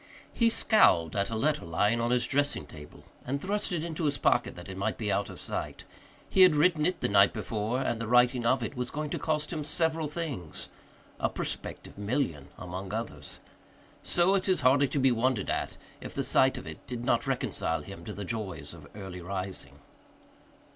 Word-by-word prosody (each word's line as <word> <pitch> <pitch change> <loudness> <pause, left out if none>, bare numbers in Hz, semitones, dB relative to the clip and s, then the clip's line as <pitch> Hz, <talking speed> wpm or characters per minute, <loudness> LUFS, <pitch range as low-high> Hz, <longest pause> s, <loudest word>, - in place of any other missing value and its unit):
He 230 -1 +3
scowled 85 - +4
at 100 +1 0
a 115 - -3
letter 150 +6 +1
lying 105 +8 +1
on 120 - 0
his 125 0 +2
dressing 145 +1 0
table 75 -1 -12 0.2
and 140 +3 -2
thrust 205 +5 0
it 170 -3 -1
into 165 -1 -3
his 145 -1 +1
pocket - - +2
that 90 - -10
it 95 - -7
might 100 +3 -2
be 105 -3 -1
out 100 +1 0
of - - -10
sight. - - -5 0.4
He 190 - +3
had 180 -4 +8
written 155 0 +3
it 185 - -2
the - - +2
night 100 0 +5
before 110 +3 -2
and 115 -3 -1
the 115 - -3
writing 125 +1 +4
of 125 +1 +2
it 125 - -4
was 125 -1 -3
going 150 0 -4
to - - -2
cost 155 0 -1
him 155 -2 -3
several 160 0 +2
things 145 - -5 0.5
a - - +1
prospective - - -6
million 100 - -1
among 95 +2 -6
others. 75 -11 -6 0.6
So 175 +2 +2
it 195 0 +1
is 185 - +2
hardly 140 +3 +4
to 145 - -3
be 135 -1 +4
wondered 120 -2 +1
at - - -2 0.2
if - - -8
the - - 0
sight 130 0 +3
of - - -7
it - - -10
did 120 -1 -5
not - - +1
reconcile - - -1
him - - -10
to - - -5
the 100 - -6
joys 110 -2 -5
of - - -12
early 95 -3 -7
rising. 95 +1 -5
125 Hz, 200 wpm, -29 LUFS, 100-150 Hz, 0.6 s, had